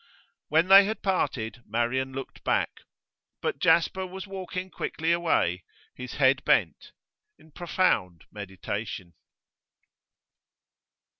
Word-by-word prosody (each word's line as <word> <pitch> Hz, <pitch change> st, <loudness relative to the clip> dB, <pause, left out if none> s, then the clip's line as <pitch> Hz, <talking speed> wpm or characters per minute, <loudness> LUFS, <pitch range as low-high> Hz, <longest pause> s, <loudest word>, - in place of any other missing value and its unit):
When 160 Hz, +4 st, +3 dB
they 195 Hz, +1 st, +9 dB
had 220 Hz, +2 st, -4 dB
parted, 125 Hz, -, -1 dB
Marian 120 Hz, +4 st, -1 dB
looked 135 Hz, 0 st, -8 dB
back. -, -, 0 dB, 0.6 s
But -, -, -3 dB
Jasper 170 Hz, +3 st, +2 dB
was 190 Hz, +2 st, -8 dB
walking 185 Hz, -1 st, -6 dB
quickly 160 Hz, +1 st, -2 dB
away, 160 Hz, -, +1 dB, 0.3 s
his 125 Hz, 0 st, -8 dB
head 135 Hz, -1 st, +3 dB
bent, -, -, +1 dB, 0.5 s
in 160 Hz, -, -21 dB
profound 145 Hz, -, 0 dB
meditation. 95 Hz, -2 st, -6 dB
150 Hz, 100 wpm, -27 LUFS, 110-185 Hz, 0.6 s, they